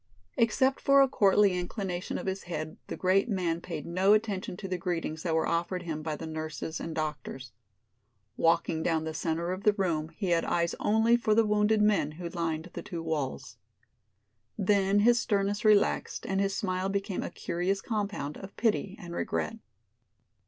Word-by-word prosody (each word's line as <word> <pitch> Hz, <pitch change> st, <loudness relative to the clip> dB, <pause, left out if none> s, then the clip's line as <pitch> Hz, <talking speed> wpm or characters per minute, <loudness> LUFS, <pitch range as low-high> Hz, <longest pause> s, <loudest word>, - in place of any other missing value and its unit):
Except 260 Hz, +4 st, +2 dB
for 275 Hz, 0 st, +6 dB
a -, -, +3 dB
courtly 200 Hz, -4 st, +4 dB
inclination 180 Hz, 0 st, -3 dB
of -, -, -6 dB
his 190 Hz, +1 st, -2 dB
head 155 Hz, -2 st, -5 dB
the -, -, -5 dB
great 195 Hz, +5 st, +2 dB
man 175 Hz, -5 st, -1 dB
paid 160 Hz, -5 st, -6 dB
no 185 Hz, +4 st, +3 dB
attention 205 Hz, -4 st, -1 dB
to 195 Hz, -, -6 dB
the 185 Hz, -1 st, -3 dB
greetings 165 Hz, -3 st, -3 dB
that 165 Hz, -2 st, 0 dB
were 160 Hz, -, +2 dB
offered 175 Hz, +2 st, -1 dB
him 160 Hz, -3 st, -4 dB
by 155 Hz, -1 st, -3 dB
the 160 Hz, -, -7 dB
nurses 155 Hz, 0 st, -5 dB
and 165 Hz, -, -5 dB
doctors. 145 Hz, -5 st, -4 dB, 0.8 s
Walking 165 Hz, -1 st, +2 dB
down 160 Hz, -1 st, +1 dB
the 160 Hz, 0 st, -4 dB
center 165 Hz, +2 st, -1 dB
of 185 Hz, +1 st, -4 dB
the 210 Hz, -, +5 dB
room 165 Hz, -6 st, -1 dB
he 185 Hz, +3 st, -4 dB
had 170 Hz, -1 st, +3 dB
eyes 170 Hz, 0 st, 0 dB
only 220 Hz, +3 st, +4 dB
for 220 Hz, -3 st, +2 dB
the 225 Hz, 0 st, +4 dB
wounded 210 Hz, 0 st, +3 dB
men 200 Hz, -8 st, +2 dB
who 170 Hz, +2 st, -6 dB
lined 165 Hz, 0 st, -3 dB
the -, -, -5 dB
two 170 Hz, -2 st, -6 dB
walls. 150 Hz, -5 st, -3 dB, 1.0 s
Then 200 Hz, 0 st, +3 dB
his 240 Hz, +2 st, +5 dB
sternness 205 Hz, -2 st, 0 dB
relaxed 210 Hz, -2 st, +2 dB
and 195 Hz, 0 st, 0 dB
his 195 Hz, 0 st, 0 dB
smile 185 Hz, -1 st, -1 dB
became 195 Hz, -1 st, -2 dB
a -, -, -4 dB
curious 180 Hz, +3 st, -2 dB
compound 200 Hz, -10 st, -3 dB
of 195 Hz, 0 st, -11 dB
pity 215 Hz, -3 st, 0 dB
and 175 Hz, -3 st, -8 dB
regret. 225 Hz, +5 st, -2 dB
185 Hz, 180 wpm, -29 LUFS, 165-205 Hz, 1.0 s, for